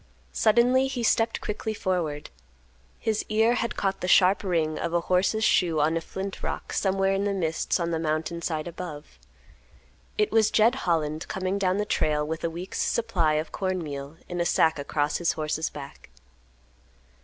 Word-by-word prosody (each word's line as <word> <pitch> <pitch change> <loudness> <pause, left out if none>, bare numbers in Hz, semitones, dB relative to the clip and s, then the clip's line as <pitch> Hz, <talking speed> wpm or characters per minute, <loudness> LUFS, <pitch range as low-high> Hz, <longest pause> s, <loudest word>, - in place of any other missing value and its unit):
Suddenly 245 +4 +4
he 260 -3 -3
stepped 225 0 +2
quickly 215 +1 -3
forward. 170 -7 -2 0.7
His 220 -1 -1
ear 220 +2 +3
had 235 -1 -2
caught 195 -1 -1
the 180 - -2
sharp 185 +2 +5
ring 160 -5 0
of 170 0 -2
a 170 - +2
horse's 185 +5 +1
shoe 170 -6 +3
on 155 +2 +2
a 165 - 0
flint 190 +3 -6
rock - - -4
somewhere 195 0 +1
in 195 +1 0
the 200 -1 0
mists 165 0 0
on 170 0 -1
the 165 - -1
mountain 160 +2 -2
side 160 -1 -2
above. 170 -4 -8 1.0
It 425 -1 +2
was 220 -1 +4
Jed 225 +3 +4
Holland 160 - -1
coming 190 +1 -2
down 185 -1 +1
the 210 - 0
trail 150 -6 +1
with 160 +1 -4
a 170 - +1
week's 175 +3 -5
supply 185 -10 +1
of 155 +1 -2
corn 185 -3 -2
meal 140 0 -7
in 175 -1 -3
a - - +3
sack 160 -2 +3
across 145 +1 -1
his 175 - +1
horse's 155 0 -2
back. 140 - -10
180 Hz, 180 wpm, -26 LUFS, 160-205 Hz, 1.0 s, sharp